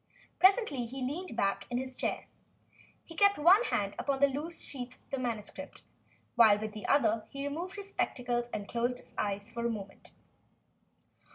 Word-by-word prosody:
Presently 370 - +4
he 260 +2 -5
leaned 315 +5 -4
back 195 -2 0
in 245 - -1
his 260 +1 -2
chair. - - -2 0.8
He 330 - -11
kept 400 +3 +5
one 360 +9 +6
hand 200 -1 0
upon 275 -1 0
the 280 - +7
loose 295 +5 -3
sheets 250 -2 -7 0.2
of 270 - -1
manuscript, 225 -4 -5 0.5
while 220 -4 +7
with 215 0 -4
the 215 - -6
other 225 -6 +3
he 275 0 -4
removed 345 +7 -4
his 400 -1 -7
spectacles. 240 -7 -1
Then 215 - -3
he 200 - -11
closed 240 +1 -1
his - - -17
eyes 205 +1 -2
for 235 0 -4
a 235 - +1
moment. 200 -4 -7
250 Hz, 175 wpm, -31 LUFS, 220-290 Hz, 0.8 s, the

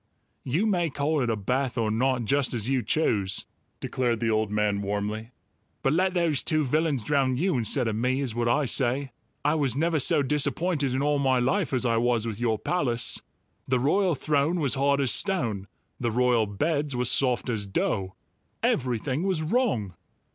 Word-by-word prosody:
"You 155 - 0
may 175 -6 +1
call 145 +1 -1
it 120 - 0
a 115 - +1
bath 125 +5 -2
or 110 -2 0
not, 125 +1 0
just 135 +1 0
as 110 -1 -3
you 135 -1 +1
choose," 100 -11 0 0.3
declared 120 -3 -1
the 115 -1 0
old 110 -1 +1
man 105 -1 0
warmly, 105 +2 -3 0.5
"but 135 - +2
let 185 +2 +1
those 165 -5 +2
two 155 -2 +1
villains 150 -2 0
drown 130 0 +1
you 180 +3 +1
instead 120 +1 +1
of 110 - -1
me, 125 +4 0
is 135 -5 -2
what 120 0 -1
I 140 +5 +2
say! 130 +2 0 0.3
I 150 - +3
was 140 -6 +1
never 160 +2 +1
so 150 +1 +4
disappointed 150 0 0
in 135 - 0
all 145 0 +1
my 135 -2 +2
life 160 +9 0
as 130 -2 0
I 115 -1 +2
was 120 -1 +1
with 110 -2 -4
your 115 -2 0
palace. 120 -2 0 0.5
The 130 - +2
royal 170 +7 +2
throne 150 +5 0
was 140 -5 +1
hard 140 +1 +2
as 130 - +2
stone; 115 - 0 0.3
the 120 - -1
royal 120 -1 +2
beds 145 +6 -1
were 125 0 0
soft 125 0 +1
as 110 -5 -2
dough; 95 -1 -2 0.5
everything 130 +3 0
was 185 -4 0
wrong." 155 - 0
130 Hz, 185 wpm, -26 LUFS, 115-150 Hz, 0.5 s, so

